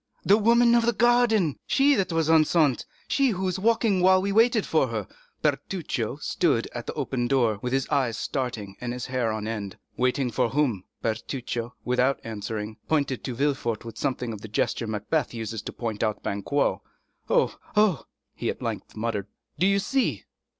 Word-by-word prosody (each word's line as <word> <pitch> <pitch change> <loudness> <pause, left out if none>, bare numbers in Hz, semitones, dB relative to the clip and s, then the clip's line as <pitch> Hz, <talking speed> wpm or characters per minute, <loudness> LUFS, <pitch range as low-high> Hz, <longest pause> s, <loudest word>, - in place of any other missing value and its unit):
"The 200 - +6
woman 235 +2 +4
of 235 -1 +4
the 235 - +3
garden!—she 240 - +3
that 195 -8 0
was 165 -1 +1
enceinte—she 160 - +2
who 190 -4 -2
was 185 0 -1
walking 220 -2 +2
while 185 +1 +5
she 200 - 0
waited 225 +1 +4
for——" 115 - 0 0.4
Bertuccio - - -1
stood - - 0
at - - -6
the - - -3
open 120 -2 -2
door, 120 -6 +2
with 125 - -3
his 135 0 0
eyes 130 -6 +1
starting 115 -9 -3
and 120 -1 -3
his 125 -1 -5
hair 125 -3 -1
on 110 -1 -3
end. 105 -4 -4 0.2
"Waiting 125 0 +1
for 120 +1 +1
whom?" 125 -10 0 0.2
Bertuccio, 120 +1 -3
without 125 +2 +2
answering, 110 0 -5
pointed 140 -5 0
to 125 - -3
Villefort 120 -5 -1
with 115 - -8
something 125 -3 -2
of 105 - -8
the 110 - -7
gesture 110 +2 -1
Macbeth 110 +6 -1
uses 110 -1 -4
to - - -6
point 115 -3 -4
out 110 -2 -1
Banquo. 100 +9 0 0.5
"Oh, - - +2 0.2
oh!" 210 - +3 0.3
he - - -3
at - - -4
length - - -4
muttered, 110 -3 -2 0.3
"do 185 - +4
you 200 0 +3
see?" 200 - 0
130 Hz, 170 wpm, -26 LUFS, 115-185 Hz, 0.5 s, The